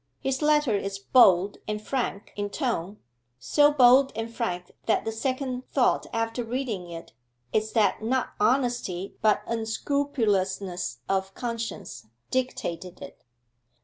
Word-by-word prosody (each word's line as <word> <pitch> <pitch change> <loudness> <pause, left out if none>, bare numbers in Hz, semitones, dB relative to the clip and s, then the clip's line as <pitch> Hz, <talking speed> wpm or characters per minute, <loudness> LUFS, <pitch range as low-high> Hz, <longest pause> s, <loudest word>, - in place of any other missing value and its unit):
His 265 +1 -2
letter 295 -6 +3
is 195 0 -2
bold 195 -3 +4
and 210 0 -2
frank 215 -3 -3
in 205 0 -2
tone, 210 - -2 0.4
so 290 - +4
bold 265 0 +6
and 225 +1 -4
frank 180 -4 -3 0.2
that 220 - +2
the 225 - -1
second 255 +2 -3
thought 260 -3 +2
after 225 +1 -1
reading 230 -7 -3
it 165 -1 -9 0.4
is 215 0 0
that 220 -2 +2
not 250 +4 0
honesty, 235 -6 0
but 215 -1 +3
unscrupulousness 205 - -1
of 190 0 -1
conscience 230 - -5 0.2
dictated 240 -9 -3
it. - - -11
225 Hz, 125 wpm, -26 LUFS, 195-255 Hz, 0.4 s, bold